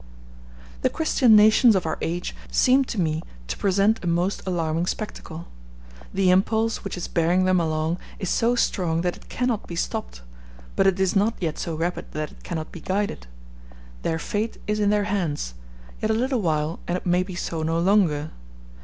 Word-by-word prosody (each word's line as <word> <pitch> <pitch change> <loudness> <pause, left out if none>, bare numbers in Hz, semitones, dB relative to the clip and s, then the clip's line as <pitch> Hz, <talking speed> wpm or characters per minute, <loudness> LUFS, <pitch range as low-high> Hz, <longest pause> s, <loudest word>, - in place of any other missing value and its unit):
The - - +3
Christian 260 -7 +4
nations 215 +2 +6
of 185 - 0
our 160 - -2
age 175 +2 -3
seem 260 +2 +4
to 230 - -4
me 160 -2 0 0.3
to - - -3
present 200 +2 +2
a - - -3
most 175 +3 0
alarming 165 -1 0
spectacle; 170 -6 -5 0.6
the 190 -1 +3
impulse 220 +4 +2
which 195 - -5
is 175 - -4
bearing 175 +2 +2
them 185 -1 +3
along 160 +1 -1 0.2
is 190 - -4
so 235 +6 +2
strong 170 -8 +1
that 175 0 -1
it - - -17
cannot 245 -4 -1
be 170 - -6
stopped, - - -4 0.5
but 195 - +3
it 190 0 +2
is 190 0 +1
not 210 +4 +2
yet 160 -4 -2
so 165 - -3
rapid 170 +3 -3
that 155 -1 -3
it - - -18
cannot 160 -3 -5
be 170 - -9
guided: 190 - -2 0.7
their 160 - -1
fate 210 +6 -2
is 210 0 -1
in 205 -1 +3
their 210 0 +2
hands; 175 - -2 0.5
yet 215 - 0
a 220 - +3
little 255 +1 0
while 155 -2 0
and 175 - 0
it - - -9
may 180 0 +3
be 185 0 -5
so 165 -2 -3
no 165 +1 0
longer. 170 -5 +2
180 Hz, 190 wpm, -24 LUFS, 165-210 Hz, 0.7 s, nations